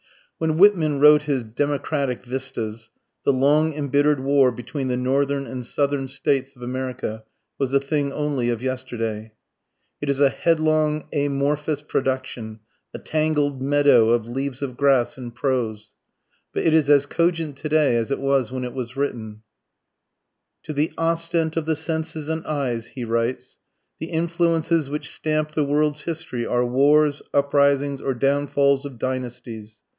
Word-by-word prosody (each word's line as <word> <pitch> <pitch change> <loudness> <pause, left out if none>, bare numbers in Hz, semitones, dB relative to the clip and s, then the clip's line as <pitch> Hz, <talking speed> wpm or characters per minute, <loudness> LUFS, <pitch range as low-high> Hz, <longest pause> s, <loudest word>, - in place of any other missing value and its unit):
When 160 -1 0
Whitman 165 -7 +4
wrote 150 +1 +7
his 140 -4 -1
"Democratic 140 +2 -2
Vistas," 115 -4 -4 0.3
the - - +4
long 145 +4 +3
embittered 145 0 +2
war 135 -1 +3
between 130 +3 -5
the 125 -1 -1
Northern 140 +2 0
and 130 -2 -6
Southern 140 +2 -1
States 135 0 -1
of 125 - -12
America 125 -3 -4 0.4
was 135 -2 0
a 140 - +4
thing 140 0 -1
only 140 -5 -1
of 120 0 -2
yesterday. 115 -4 -4 0.7
It 145 - -3
is 140 -1 0
a 140 -1 +5
headlong 155 0 +1
amorphous 145 +1 0
production 130 -6 -3 0.3
a - - -7
tangled 150 -3 0
meadow 140 -4 +4
of 115 -1 +2
"leaves 135 +2 -4
of 130 -3 -4
grass" 135 -3 +2
in 125 -2 -6
prose. 115 -4 -2 0.6
But - - -2
it 160 - +3
is 155 -3 +3
as 145 -1 +5
cogent 165 -1 0
to 155 - -5
day 150 -5 +3
as 115 +1 0
it 140 - 0
was 135 -3 +1
when 130 0 -4
it 125 -1 -5
was 125 0 -6
written: 110 -6 -4 1.2
To 155 - -5
the 150 +2 0
ostent 165 -1 0
of 165 -2 -1
the 160 - +2
senses 160 -1 -3
and 160 0 -2
eyes 125 -6 -2
[he 125 -3 -6
writes], 115 +2 -2 0.4
the 160 - -4
influences 165 -2 +1
which 150 +1 -4
stamp 155 0 -1
the 155 -1 0
world's 150 +1 0
history 160 -8 -4
are 125 0 +1
wars, 145 +4 +3
uprisings, 140 0 +2
or 135 - -1
downfalls 140 +1 +2
of 135 -4 -8
dynasties.... 120 -4 -5
140 Hz, 155 wpm, -23 LUFS, 125-150 Hz, 1.2 s, wrote